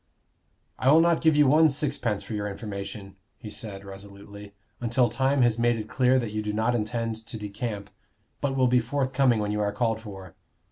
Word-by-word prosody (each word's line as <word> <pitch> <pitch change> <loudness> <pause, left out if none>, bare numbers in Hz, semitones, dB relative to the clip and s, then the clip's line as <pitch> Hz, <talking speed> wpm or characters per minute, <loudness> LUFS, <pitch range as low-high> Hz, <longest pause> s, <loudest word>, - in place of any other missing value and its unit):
"I 130 - +4
will 155 - +7
not 170 0 +3
give 160 -2 +4
you 150 0 +5
one 155 +4 +5
sixpence 135 -7 -2
for - - -7
your 105 -1 -2
information," 100 -1 -7 0.2
he 110 -3 -9
said, 100 -4 -7
resolutely, 100 +1 -11 0.2
"until 120 +1 +2
time 135 +3 +1
has 120 -1 +2
made 120 0 +3
it 110 -1 -5
clear 130 +2 +2
that 120 -4 -2
you 110 0 -2
do 105 0 -3
not 110 +3 +1
intend 115 0 -2
to 110 0 -7
decamp, 105 -1 -5 0.5
but 135 -1 -1
will 130 -1 +3
be 125 0 +4
forthcoming 130 -1 +1
when 105 0 -1
you 105 0 -1
are 105 0 0
called 110 +1 -1
for. 95 -5 -10
115 Hz, 195 wpm, -26 LUFS, 105-130 Hz, 0.5 s, will